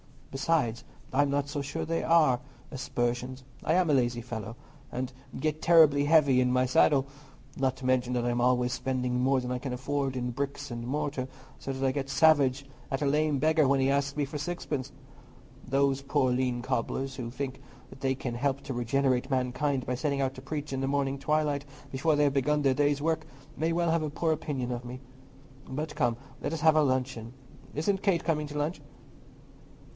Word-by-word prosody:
Besides, 135 -5 0 0.3
I'm 140 +2 +3
not 140 0 0
so 145 0 -2
sure 140 - -4
that 165 - -3
they 165 - 0
are 155 -7 +4 0.3
aspersions. 130 -1 -2 0.2
I 155 - +2
am 180 -1 +3
a - - +4
lazy 120 -2 +1
fellow, 115 -1 -6 0.3
and 130 +1 -4 0.3
get 155 +2 -1
terribly 155 -4 +6
heavy 145 -4 +5
in 125 0 +3
my 130 0 +3
saddle; 135 +2 +4 0.5
not 130 -1 +1
to 130 - -8
mention 125 -1 +2
that 120 -1 0
I'm 120 0 0
always 125 0 +2
spending 125 0 -1
more 130 +1 +2
than 125 0 -4
I 125 - -1
can 130 0 -4
afford 135 +1 -2
in 125 -1 -2
bricks 140 +2 -4
and 120 0 -5
mortar, 140 -1 -2 0.3
so 135 - -4
that 135 0 -2
I 130 - +3
get 135 0 -3
savage 140 -2 +4 0.2
at 135 0 -2
a - - +1
lame 150 +1 +2
beggar 155 -1 +3
when 135 0 +3
he 135 +1 +3
asks 140 0 0
me 150 - 0
for 145 +2 -6
sixpence. 145 -4 -4 0.8
Those 135 +1 +2
poor 135 -2 +1
lean 125 -1 0
cobblers, 130 +2 -2
who 120 -3 -4
think 130 +2 -5 0.4
they 135 -1 0
can 125 -2 -4
help 135 +2 0
to 135 -1 -5
regenerate 130 +1 +1
mankind 130 +1 0
by 125 - -1
setting 140 +1 -1
out 135 -1 0
to 130 - -9
preach 145 +2 -5
in 135 - -2
the 135 - 0
morning 140 -1 0
twilight 150 -1 0 0.3
before 150 +4 +2
they 145 0 +4
begin 145 +2 +1
their 135 -2 +3
day's 145 +1 +1
work, 160 +1 0 0.3
may 160 +3 0
well 170 -1 +1
have 165 0 +2
a 155 - -2
poor 160 +2 0
opinion 145 -5 -2
of 120 0 -4
me. 125 +1 -7 0.7
But 150 +3 -4
come, 120 -4 +1 0.3
let - - -2
us 160 - -3
have 160 -1 +5
our 155 - +5
luncheon. 130 -3 -1 0.4
Isn't 190 +6 0
Kate 190 -5 +2
coming 150 -2 0
to 150 0 -6
lunch?" 150 +4 -2
135 Hz, 200 wpm, -29 LUFS, 125-150 Hz, 0.8 s, terribly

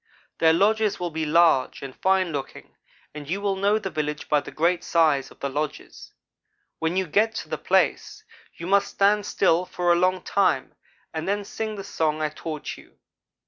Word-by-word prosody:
Their 160 -1 +5
lodges 215 +4 +2
will 175 -1 -3
be 160 0 -2
large 160 -5 +3
and 135 -1 -8
fine 190 -2 +1
looking 140 -3 -7 0.4
and 150 -1 -9
you 190 +4 -1
will 200 -1 0
know 200 +2 +2
the 195 -3 -5
village 150 -1 -3
by 150 - +4
the 145 - -9
great 170 +3 0
size 155 -5 +2
of - - -18
the 140 - -1
lodges. 145 +2 -5 0.7
When 165 +2 -1
you 190 - +1
get 215 +7 +1
to - - -5
the - - -3
place, - - 0 0.3
you 170 - -8
must 200 +2 +3
stand 205 +1 +2
still 180 -2 +2
for 180 -1 0
a - - +5
long 185 0 +1
time, 190 -9 +1 0.4
and 160 +2 -4
then 205 +1 -1
sing 215 +1 -4
the 195 - -6
song 160 -6 -1
I 155 -1 0
taught 155 0 -6
you. - - -19
175 Hz, 190 wpm, -24 LUFS, 155-195 Hz, 0.7 s, Their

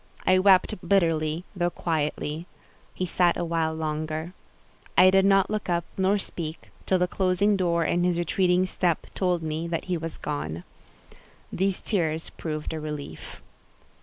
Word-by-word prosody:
I 185 0 +5
wept 190 -1 +5
bitterly, 165 -3 +1
though 175 -1 +1
quietly. 155 0 -2 0.5
He 185 - -1
sat 175 0 +2
a 175 - -1
while 165 -1 0
longer. 155 +2 -3 0.6
I 185 0 +8
did 195 0 +4
not 195 0 +4
look 215 -3 -2
up 170 -1 0
nor 190 +2 +2
speak, 165 -4 -6 0.2
till 190 - +3
the 180 0 +1
closing 190 +3 +2
door 170 -3 +1
and 175 +2 +1
his 175 -1 +1
retreating 180 +1 +2
step 180 -3 0
told 180 -3 0
me 160 +1 -3
that 165 -1 -3
he 180 -2 -1
was 165 0 -6
gone. 85 - -4 0.9
These 190 +1 0
tears 160 -5 -1
proved 155 -1 -5
a 160 - -3
relief. 145 - -7
170 Hz, 155 wpm, -26 LUFS, 155-185 Hz, 0.9 s, I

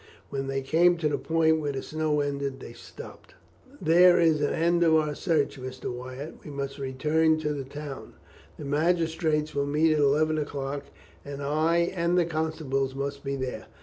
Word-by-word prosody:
When 135 -1 -3
they 135 0 -2
came 175 +5 +4
to 160 -2 0
the 145 - -1
point 160 -1 +2
where 145 -2 -2
the 135 - -4
snow 155 -1 0
ended 140 -1 -3
they 115 - -10
stopped. 275 - -12 0.4
"There 175 +2 +6
is 160 -3 +3
an 145 - +1
end 170 +1 +1
of 160 -1 +4
our 155 -1 +2
search, 150 -5 0
Mr. 130 -1 -5
Wyatt. 130 +4 -8
We - - -9
must 140 0 -5
return 155 +4 +1
to 150 -1 -1
the 140 -2 -4
town. 145 0 -8 0.4
The 150 - -7
magistrates 160 0 0
will 140 0 -1
meet 155 +2 +3
at 155 - +1
eleven 155 +2 +3
o'clock, 140 -1 -4 0.4
and 140 0 -7
I 160 +4 +1
and 170 0 +1
the 175 - +4
constables 155 -5 -2
must 140 0 -4
be 140 -1 -2
there. 130 -2 -5
150 Hz, 180 wpm, -27 LUFS, 140-160 Hz, 0.4 s, There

